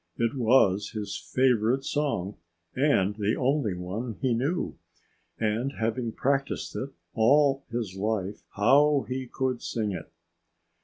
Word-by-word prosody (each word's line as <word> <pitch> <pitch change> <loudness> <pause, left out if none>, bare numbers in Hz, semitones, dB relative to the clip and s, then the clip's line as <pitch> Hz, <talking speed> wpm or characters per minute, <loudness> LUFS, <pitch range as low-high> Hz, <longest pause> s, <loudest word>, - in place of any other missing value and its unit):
It 115 -1 +1
was 110 -6 +3
his 105 -2 -4
favorite 130 0 +1
song 135 -12 -1 0.4
and 130 -8 +2
the 105 +1 +1
only 130 -6 +1
one 100 +6 -5
he 130 -3 +1
knew. 140 +10 -1 0.6
And 115 +5 -1
having 115 +1 -2
practiced 135 +3 -1
it 135 - -3 0.2
all 135 +4 +4
his 115 -5 -3
life, 100 -1 -2
how 140 +7 +4
he 130 0 -3
could 130 0 -2
sing 110 -3 -2
it! 90 -4 -7
120 Hz, 125 wpm, -27 LUFS, 105-135 Hz, 0.6 s, all